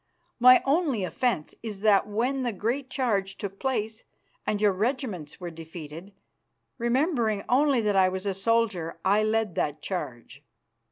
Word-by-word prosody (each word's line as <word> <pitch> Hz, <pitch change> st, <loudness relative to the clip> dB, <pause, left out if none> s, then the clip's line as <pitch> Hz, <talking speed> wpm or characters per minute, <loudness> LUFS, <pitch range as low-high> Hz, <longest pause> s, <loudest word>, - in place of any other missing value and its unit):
My 255 Hz, +1 st, +7 dB
only 280 Hz, -, +1 dB
offence 185 Hz, -3 st, -1 dB
is 210 Hz, -4 st, -7 dB
that 210 Hz, -2 st, +4 dB
when 245 Hz, +6 st, -1 dB
the 245 Hz, -2 st, -1 dB
great 245 Hz, +7 st, -2 dB
charge 200 Hz, -8 st, -1 dB
took 195 Hz, -1 st, -6 dB
place 225 Hz, -4 st, -2 dB, 0.4 s
and 210 Hz, -, 0 dB
your 210 Hz, -1 st, +4 dB
regiments 210 Hz, -, -3 dB
were 175 Hz, -2 st, -6 dB
defeated, 165 Hz, +2 st, -9 dB, 0.7 s
remembering 235 Hz, -, +1 dB
only 270 Hz, -1 st, +3 dB
that 210 Hz, -2 st, +1 dB
I 190 Hz, -1 st, +5 dB
was 190 Hz, +1 st, -5 dB
a 200 Hz, -, 0 dB
soldier, 195 Hz, -5 st, 0 dB
I 200 Hz, +3 st, +4 dB
led 215 Hz, -2 st, 0 dB
that 150 Hz, -1 st, -1 dB
charge. 135 Hz, -7 st, -6 dB
210 Hz, 150 wpm, -27 LUFS, 185-245 Hz, 0.7 s, My